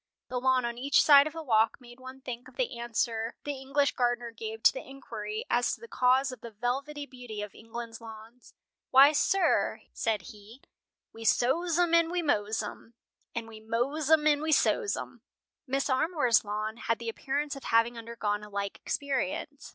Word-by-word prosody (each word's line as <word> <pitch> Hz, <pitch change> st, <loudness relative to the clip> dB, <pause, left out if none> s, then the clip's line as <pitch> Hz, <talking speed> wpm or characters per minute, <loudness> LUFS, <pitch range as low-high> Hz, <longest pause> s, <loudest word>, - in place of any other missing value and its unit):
The 250 Hz, 0 st, -2 dB
lawn 260 Hz, -1 st, +3 dB
on 235 Hz, 0 st, -4 dB
each 275 Hz, +2 st, +4 dB
side 285 Hz, -1 st, +8 dB
of 310 Hz, -, -7 dB
the 325 Hz, 0 st, -6 dB
walk 225 Hz, -3 st, +2 dB
made 240 Hz, 0 st, -15 dB
one 260 Hz, +1 st, -10 dB
think 250 Hz, -1 st, -7 dB
of -, -, -17 dB
the 470 Hz, -, -2 dB
answer 230 Hz, -1 st, -2 dB
the 285 Hz, -2 st, -4 dB
English 280 Hz, +1 st, +1 dB
gardener 240 Hz, -2 st, -1 dB
gave 225 Hz, 0 st, -7 dB
to -, -, +7 dB
the -, -, -6 dB
inquiry 215 Hz, -5 st, -6 dB
as 245 Hz, 0 st, +1 dB
to -, -, -22 dB
the 465 Hz, -, -11 dB
cause 260 Hz, -, +2 dB
of 255 Hz, -3 st, -10 dB
the 235 Hz, -, -7 dB
velvety 270 Hz, +7 st, -3 dB
beauty 245 Hz, -6 st, -7 dB
of 210 Hz, -, -8 dB
England's 230 Hz, +1 st, -8 dB
lawns. 225 Hz, +2 st, -13 dB, 0.3 s
"Why, 275 Hz, +2 st, +8 dB
sir," 380 Hz, +6 st, +2 dB
said 215 Hz, -5 st, -1 dB
he, 215 Hz, +5 st, -15 dB, 0.5 s
"we 225 Hz, -, -9 dB
sows 320 Hz, +9 st, +2 dB
'em, 350 Hz, -1 st, +2 dB
and 335 Hz, -1 st, +5 dB
we 350 Hz, 0 st, -1 dB
mows 215 Hz, -7 st, 0 dB
'em, 225 Hz, +2 st, -9 dB, 0.4 s
and 230 Hz, -1 st, -3 dB
we 220 Hz, -1 st, -11 dB
mows 245 Hz, +7 st, -1 dB
'em, 315 Hz, -1 st, +5 dB
and 295 Hz, -1 st, +4 dB
we 315 Hz, 0 st, -1 dB
sows 420 Hz, +7 st, +2 dB
'em." -, -, -8 dB, 0.5 s
Mrs. 275 Hz, +1 st, +1 dB
Armour's 260 Hz, -5 st, +2 dB
lawn 215 Hz, +1 st, -3 dB
had 230 Hz, -1 st, -1 dB
the 235 Hz, -, -8 dB
appearance 280 Hz, +5 st, -2 dB
of 275 Hz, -, -10 dB
having 230 Hz, +1 st, +3 dB
undergone 225 Hz, -3 st, -3 dB
a 210 Hz, -, -10 dB
like 200 Hz, -1 st, -4 dB
experience. 280 Hz, +1 st, -3 dB
245 Hz, 190 wpm, -29 LUFS, 225-280 Hz, 0.5 s, side